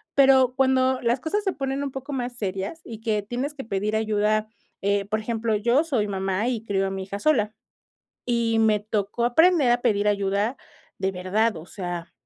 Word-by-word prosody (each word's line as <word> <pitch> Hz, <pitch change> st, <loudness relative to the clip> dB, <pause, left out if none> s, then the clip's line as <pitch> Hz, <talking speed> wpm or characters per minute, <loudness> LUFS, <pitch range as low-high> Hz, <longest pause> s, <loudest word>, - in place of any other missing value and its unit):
pero 265 Hz, -2 st, +5 dB
cuando 260 Hz, -1 st, +2 dB
las 235 Hz, +2 st, +1 dB
cosas 410 Hz, +6 st, -1 dB
se 385 Hz, -2 st, 0 dB
ponen 270 Hz, 0 st, -2 dB
un 280 Hz, -, -3 dB
poco 270 Hz, +2 st, -6 dB
más 245 Hz, -2 st, -3 dB
serias 195 Hz, -, -4 dB
y 225 Hz, -2 st, -9 dB
que 220 Hz, -2 st, 0 dB
tienes 250 Hz, +7 st, -3 dB
que 270 Hz, -, -6 dB
pedir 210 Hz, 0 st, -1 dB
ayuda, 215 Hz, 0 st, +1 dB, 0.4 s
eh, 200 Hz, 0 st, +1 dB
por 215 Hz, +2 st, -1 dB
ejemplo, 225 Hz, 0 st, -1 dB
yo 235 Hz, +8 st, +3 dB
soy 245 Hz, -10 st, 0 dB
mamá 195 Hz, +2 st, -1 dB
y 230 Hz, -3 st, -3 dB
crío 195 Hz, -2 st, 0 dB
a -, -, -3 dB
mi 190 Hz, 0 st, -4 dB
hija 200 Hz, +1 st, -6 dB
sola, 215 Hz, -5 st, +2 dB, 0.7 s
y 235 Hz, -2 st, +1 dB
me 215 Hz, -2 st, +3 dB
tocó 210 Hz, +2 st, -2 dB
aprender 310 Hz, +2 st, +4 dB
a 240 Hz, 0 st, +3 dB
pedir 210 Hz, -3 st, +2 dB
ayuda 200 Hz, +4 st, 0 dB, 0.4 s
de 190 Hz, 0 st, -1 dB
verdad, 190 Hz, +3 st, 0 dB
o 160 Hz, -, -8 dB
sea, 175 Hz, -3 st, -6 dB
220 Hz, 190 wpm, -24 LUFS, 200-255 Hz, 0.7 s, pero